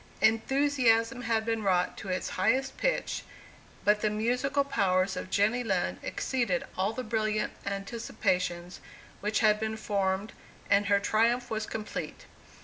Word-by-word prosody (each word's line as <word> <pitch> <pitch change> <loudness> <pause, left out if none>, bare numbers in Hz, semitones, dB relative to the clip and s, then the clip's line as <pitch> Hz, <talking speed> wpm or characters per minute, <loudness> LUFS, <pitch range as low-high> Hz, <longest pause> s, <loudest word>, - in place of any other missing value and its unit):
Enthusiasm 235 +1 +3
had 225 -2 0
been 225 -1 -1
wrought 185 -3 +1
to 195 - -7
its 185 0 -2
highest 265 +8 +1
pitch, - - -1 0.6
but 210 0 +4
the 215 - +2
musical 250 +6 +1
powers 190 -7 +1
of 185 - -5
Jenny 220 +6 +2
Lind 190 -6 -1
exceeded 235 -10 -1
all 190 +3 +1
the 255 +3 -5
brilliant 215 -1 -1
anticipations 185 -4 -2 0.4
which 210 +1 0
had 210 -1 +4
been 220 0 -2
formed, 200 -1 -1 0.4
and 200 0 +4
her 200 -1 +4
triumph 235 +4 +1
was 220 -1 -2
complete. 215 -1 -5
215 Hz, 140 wpm, -29 LUFS, 195-235 Hz, 0.6 s, but